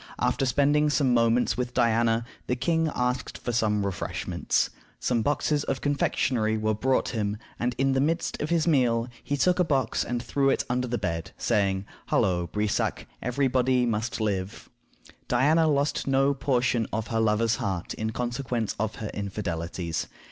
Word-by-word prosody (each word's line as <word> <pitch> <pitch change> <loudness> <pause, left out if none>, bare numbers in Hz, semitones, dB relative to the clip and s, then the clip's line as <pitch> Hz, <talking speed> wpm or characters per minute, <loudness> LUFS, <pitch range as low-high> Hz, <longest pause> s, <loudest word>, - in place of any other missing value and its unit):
After 135 - +1
spending 145 +4 +3
some 140 -4 +2
moments 115 +1 +3
with 125 -1 -3
Diana, 115 -1 +2 0.2
the 125 - +1
king 165 +4 +1
asked 125 0 -1
for 120 - -3
some 105 -3 +1
refreshments. 95 -3 -1 0.3
Some 120 -2 +1
boxes 145 +3 +1
of 135 - -1
confectionery 125 -6 +1
were 110 0 +1
brought 130 +5 +1
him, 105 -3 -2 0.2
and 120 0 -1
in 135 0 +2
the 135 - +2
midst 165 +4 -1
of 150 - -2
his 170 -2 +2
meal 125 -7 +2 0.2
he 145 - -1
took 180 +5 +2
a - - +5
box 135 -8 0
and 120 0 -2
threw 135 +1 +1
it - - +2
under 125 +1 -1
the 120 0 -1
bed, 85 -5 -3
saying, 100 -4 +1 0.2
"Halloo, 90 -2 +1
Brissac, 105 +4 -1 0.2
every 130 +3 +1
body 125 -1 +2
must 115 0 -1
live!" 100 -3 -3 0.6
Diana 160 +4 +3
lost 145 -1 +1
no 135 +1 +3
portion 125 -4 +1
of 110 +1 -3
her 115 - 0
lover's 110 +1 +2
heart 95 -3 -3
in 110 - -3
consequence 120 -2 -2
of 110 0 -1
her 110 -2 -5
infidelities. 85 -4 -3
120 Hz, 165 wpm, -27 LUFS, 110-135 Hz, 0.6 s, a